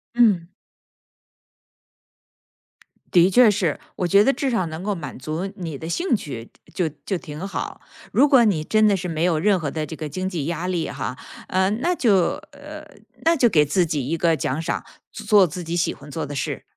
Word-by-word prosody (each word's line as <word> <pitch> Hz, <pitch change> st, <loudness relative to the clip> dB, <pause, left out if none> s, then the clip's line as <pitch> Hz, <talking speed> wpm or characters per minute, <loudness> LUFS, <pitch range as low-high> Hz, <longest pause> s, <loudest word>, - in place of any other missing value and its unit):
嗯。 205 Hz, -8 st, +4 dB, 2.6 s
的 180 Hz, +1 st, +5 dB
确 245 Hz, +1 st, +7 dB
是， 190 Hz, -7 st, 0 dB, 0.2 s
我 180 Hz, -, -1 dB
觉 200 Hz, +4 st, +5 dB
得 275 Hz, +3 st, +3 dB
至 275 Hz, -, -1 dB
少 210 Hz, -7 st, 0 dB
能 160 Hz, +2 st, -6 dB
够 205 Hz, 0 st, -1 dB
满 165 Hz, -6 st, -7 dB
足 155 Hz, +8 st, -4 dB
你 165 Hz, -7 st, -6 dB
的 160 Hz, -, -7 dB
兴 275 Hz, -, 0 dB
趣， 130 Hz, -, -7 dB, 0.2 s
就 180 Hz, -5 st, 0 dB
就 150 Hz, -, -20 dB
就 195 Hz, -, -1 dB
挺 165 Hz, +2 st, -7 dB
好。 -, -, -5 dB, 0.3 s
如 290 Hz, -, +5 dB
果 265 Hz, -4 st, +6 dB
你 185 Hz, -8 st, +2 dB
真 215 Hz, +6 st, +3 dB
的 200 Hz, -2 st, +3 dB
是 180 Hz, 0 st, -4 dB
没 160 Hz, 0 st, -2 dB
有 170 Hz, -3 st, +2 dB
任 195 Hz, +3 st, +3 dB
何 145 Hz, -4 st, -3 dB
的 155 Hz, -1 st, -3 dB
这 160 Hz, -, -7 dB
个 155 Hz, -1 st, -6 dB
经 185 Hz, +6 st, -3 dB
济 170 Hz, -7 st, -3 dB
压 170 Hz, +2 st, -3 dB
力 175 Hz, -3 st, -1 dB
哈， 125 Hz, +2 st, -5 dB, 0.3 s
呃， 190 Hz, +1 st, +2 dB
那 325 Hz, -, 0 dB
就 230 Hz, -9 st, +3 dB, 0.4 s
呃， 300 Hz, +2 st, -10 dB, 0.4 s
那 330 Hz, +1 st, +4 dB
就 250 Hz, -5 st, +4 dB
给 155 Hz, -8 st, +4 dB
自 170 Hz, +5 st, +2 dB
己 150 Hz, -5 st, -2 dB
一 165 Hz, -, -1 dB
个 165 Hz, 0 st, +2 dB
奖 135 Hz, +2 st, -2 dB
赏， 170 Hz, +1 st, -3 dB, 0.3 s
做 205 Hz, -4 st, +4 dB
自 175 Hz, +4 st, -6 dB
己 165 Hz, +1 st, -3 dB
喜 175 Hz, -, +1 dB
欢 145 Hz, -, -13 dB
做 160 Hz, -, -3 dB
的 145 Hz, 0 st, -7 dB
事。 -, -, -3 dB
175 Hz, 220 characters per minute, -22 LUFS, 155-210 Hz, 2.6 s, 确